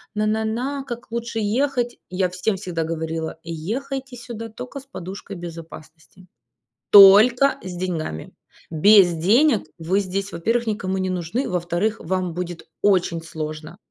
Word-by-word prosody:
на 210 0 0
на 220 +1 0
на, 260 +5 -2
как 240 -2 -8
лучше 235 -1 -3
ехать". 245 +3 0
Я 185 0 0
всем 185 +4 -1
всегда 180 -4 -3
говорила: 160 0 -4
"Ехайте 250 - -5
сюда 235 -2 -7
тока 250 +5 -8
с 270 - -16
подушкой 195 -4 -8
безопасности, 165 +1 -11 0.6
только 220 +7 +8
с 185 -1 -6
деньгами". 170 - -4 0.4
Без 185 +2 +6
денег 215 - +3
вы 180 +4 0
здесь, 195 +1 -3
во-первых, 230 +8 0
никому 190 -3 -2
не 185 0 -1
нужны, 180 +9 -2
во-вторых, 180 +5 -1
вам 180 0 -2
будет 175 -1 -6
очень 180 -4 +2
сложно. 155 +1 -7
190 Hz, 140 wpm, -22 LUFS, 170-230 Hz, 0.6 s, только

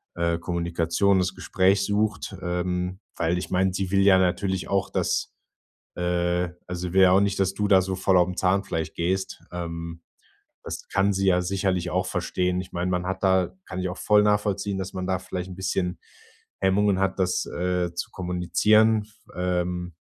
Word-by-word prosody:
äh, 85 -1 0
Kommunikation, 85 +2 +1
das 90 0 -1
Gespräch 95 +1 +2
sucht. 105 -1 -1
Ähm, 90 +1 -2 0.2
weil 85 +1 +1
ich 90 - -5
meine, 95 0 +2
sie 95 -1 -2
will 100 0 +3
ja 95 -1 +6
natürlich 95 0 0
auch, 100 -1 0
dass, - - -1 0.6
äh 90 0 0 0.2
also, 90 -1 -5
sie - - -9
will 95 0 +6
ja 90 - +6
auch 95 - +5
nicht, 100 -1 0
dass 95 -1 +1
du 105 - 0
da 95 -2 +6
so 95 0 -3
voll 95 0 +2
aufm 90 0 +2
Zahnfleisch 95 -3 0
gehst. 95 +3 -2
Ähm, 85 -1 -6 0.6
das - - -6
kann 100 0 +2
sie 95 0 0
ja 90 -1 +4
sicherlich 90 -1 -1
auch - - 0
verstehen. 90 0 -1
Ich 90 - -12
meine, 90 +1 -1
man 90 0 -1
hat 95 0 -3
da 95 -1 +2
kann 95 - -6
ich 95 0 -1
auch 90 - -6
voll 105 -1 +4
nachvollziehen, 105 -1 0
dass 95 -1 -5
man 95 -1 -4
da 95 -1 0
vielleicht 90 0 -5
'n 90 - -8
bisschen 90 -2 -2 0.6
Hemmungen 95 0 +2
hat, 95 0 0
das, 90 -1 +1
äh, 90 -1 -1
zu 85 - -4
kommunizieren. 105 +5 +2 0.3
Ähm, 90 -1 -2
90 Hz, 180 wpm, -25 LUFS, 90-95 Hz, 0.6 s, ja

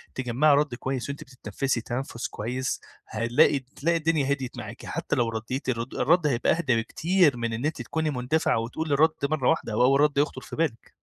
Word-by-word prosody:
تجمَّعي 130 +4 +3
رد 145 -3 +1
كويس 130 +1 -3
وأنتِ 140 - -5
بتتنفسي 125 0 -3
تنفس 120 0 -4
كويس 125 +4 -3 0.3
هنلاقي 115 +5 +3
تلاقي 145 +6 -1
الدنيا 155 -4 +1
هديت 130 -3 -6
معاكِ - - -8
حتى - - -2
لو 120 -2 +1
رديتِ 115 +4 -4
الرد 120 0 -3
الرد 160 +4 +3
هيبقى 125 -4 +2
أهدا 150 -7 +1
بكتير 155 +5 +2
من 115 -1 -2
إن 115 +5 -3
أنتِ 155 -4 -2
تكوني 155 +6 -2
مندفعة 125 -1 +1
وتقولي 145 +7 -3
الرد 155 +3 +5 0.2
مرة 145 -5 +1
واحدة 105 - 0
أو 115 - +3
أول 135 +2 +4
رد 150 -1 +2
يخطر 145 +2 0
في - - -9
بالِك. 150 -8 -2
135 Hz, 190 wpm, -26 LUFS, 120-150 Hz, 0.3 s, الرد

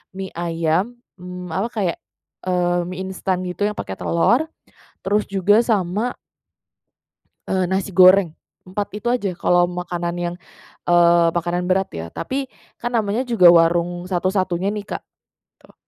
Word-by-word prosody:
mie 190 0 -5
ayam, 170 +6 -1 0.2
mmm, 180 0 -8
apa 195 +4 0
kayak, 190 -6 -1 0.5
eee, 175 -1 +1
mie 185 0 -6
instan 185 -1 -2
gitu 180 +3 -4
yang 210 - -2
pakai 95 - -5
telur, 225 - +2 0.6
terus 205 +2 +1
juga 200 +2 +3
sama 210 +2 0 1.3
eee 185 -1 0
nasi 190 0 -2
goreng, 185 -2 +6 0.3
4 200 +2 -4
itu 210 - -12
aja 225 -6 -1
kalau 175 0 +3
makanan 175 -1 -4
yang, 175 0 -3 0.5
eee, 170 -1 +5
makanan 175 +2 -2
berat 190 +1 +1
ya. 80 0 -5
Tapi 265 - -4 0.3
kan 240 - -1
namanya 215 +3 0
juga 235 -8 +2
warung 175 +2 +2
satu-satunya 185 +1 0
nih 205 -1 -5
Kak, - - -5 0.6
tuh. - - -21
185 Hz, 140 wpm, -21 LUFS, 175-200 Hz, 1.3 s, goreng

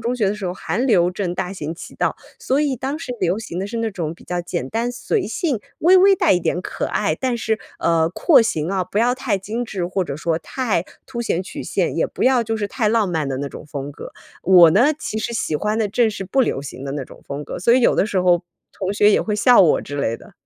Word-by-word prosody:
中 240 +2 -2
学 215 -5 +1
的 205 - -1
时 210 -2 -7
候， 180 - -1
韩 210 +6 -2
流 180 -8 +3
正 180 -2 -2
大 180 +1 -3
行 160 -4 -5
其 170 - -10
道， - - -1 0.2
所 270 +3 +1
以 285 -3 +1
当 270 +5 -4
时 250 - -5
流 180 +2 +1
行 185 -5 -5
的 - - -2
是 230 - -5
那 230 -1 0
种 165 -4 -3
比 - - -16
较 180 0 -2
简 170 -6 -4
单 230 - -1
随 240 -4 -2
性， 255 - -1 0.2
微 365 +4 +6
微 390 +1 +6
带 - - +3
一 180 - +2
点 175 +1 -1
可 - - -4
爱。 - - 0
但 255 -2 -1
是， 220 -1 0 0.2
呃， 165 -1 +2
廓 265 - +4
形 160 -8 -1
啊， 190 -1 0
不 200 - -3
要 245 +2 +3
太 255 -6 -1
精 220 +5 -4
致， 190 -6 -3
或 185 +1 -1
者 140 -6 -5
说 160 +1 -1
太 210 -3 -1 0.2
凸 235 -2 -4
显 175 - 0
曲 190 - -7
线， - - -1
也 - - +1
不 - - -3
要 255 -2 +4
就 225 0 -2
是 210 - -2
太 215 +1 -1
浪 215 -3 +2
漫 160 -5 -1
的 135 - -2
那 140 +1 -3
种 - - -10
风 145 -1 -6
格。 - - -9 0.3
我 175 -3 +7
呢， 245 - +4
其 215 - -4
实 235 - -3
喜 190 -8 -2
欢 210 +8 0
的 220 - +1
正 220 +2 +2
是 195 -2 -6
不 235 +9 +1
流 135 - -2
行 135 -1 -8
的 135 - -4
那 140 -2 -4
种 - - -16
风 145 +1 -5
格， - - -6
所 235 +7 +4
以 260 - +4
有 235 - +4
的 200 - +2
时 190 -3 0
候， 175 -1 +3 0.3
同 190 0 -3
学 205 +1 +4
也 - - +3
会 210 -1 -2
笑 245 +2 +6
我 170 - +4
之 145 - -7
类 115 -5 -1
的。 - - -17
200 Hz, 290 characters per minute, -21 LUFS, 170-235 Hz, 0.3 s, 我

